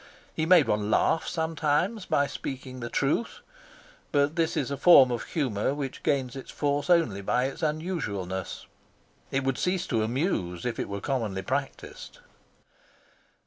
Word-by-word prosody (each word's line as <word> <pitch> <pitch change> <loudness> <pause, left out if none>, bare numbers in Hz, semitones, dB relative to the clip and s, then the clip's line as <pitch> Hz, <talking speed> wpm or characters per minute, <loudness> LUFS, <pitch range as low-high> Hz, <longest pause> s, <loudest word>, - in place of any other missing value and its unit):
He 160 - -1
made 175 -4 +6
one 105 0 0
laugh 160 - +2
sometimes 165 +5 -1
by 140 - +2
speaking 130 -2 -6
the 120 -1 -5
truth, 145 - -1 0.7
but 145 +1 +2
this 165 -1 0
is 140 -2 -1
a - - -1
form 135 -5 +7
of 120 - -2
humour 130 -4 -1
which 140 -3 -5
gains 130 -3 0
its 135 - -8
force 145 +2 -1
only 160 - +3
by 125 +5 +1
its 135 - -5
unusualness; 150 - -3 0.6
it 135 0 -1
would 135 -1 -1
cease 180 0 0
to 115 -3 0
amuse 110 - -1
if 120 - -2
it - - -3
were 100 0 -4
commonly 110 -8 -2
practised. - - -5
135 Hz, 150 wpm, -27 LUFS, 115-160 Hz, 0.7 s, form